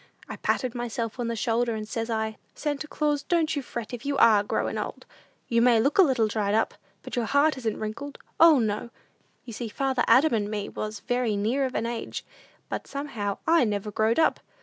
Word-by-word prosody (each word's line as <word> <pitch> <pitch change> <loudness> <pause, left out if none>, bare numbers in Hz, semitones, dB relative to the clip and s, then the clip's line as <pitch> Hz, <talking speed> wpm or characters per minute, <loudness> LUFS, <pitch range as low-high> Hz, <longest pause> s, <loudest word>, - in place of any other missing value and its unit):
I - - -7
patted 255 -3 0
myself 240 -1 -4
on 240 - -1
the 230 - -2
shoulder, 230 +1 0
and 215 -1 -5
says 225 +2 -3
I, 220 -1 -2 0.2
'Santa 295 0 -3
Claus, 295 -1 0
don't 325 -2 +1
you 285 - -1
fret 235 -3 -6
if 240 0 -6
you 280 -1 -1
are 215 -5 +6
growin' 205 - -2
old! - - -6 0.4
You 235 -1 +2
may 240 -2 +5
look 280 - +1
a - - +11
little 260 -10 +3
dried 210 -1 0
up, 225 - +1 0.3
but - - -6
your 240 -2 0
heart 285 +4 +3
isn't 225 -4 -2
wrinkled; 235 +7 -5 0.2
O 325 -2 +8
no!' 220 -1 -1 0.6
You 235 - -8
see 235 +2 -4
father 265 +1 0
Adam 265 +6 +5
and 210 -2 0
me 210 -1 -3
was 215 -1 -5
very 245 -4 0
near 240 +7 +1
of 255 - -4
an - - 0
age, 235 0 -4 0.4
but - - -5
somehow 235 -9 -4
I 330 -3 +5
never 210 -2 -2
growed 220 +2 +1
up! 320 - +3
235 Hz, 210 wpm, -26 LUFS, 220-275 Hz, 0.6 s, a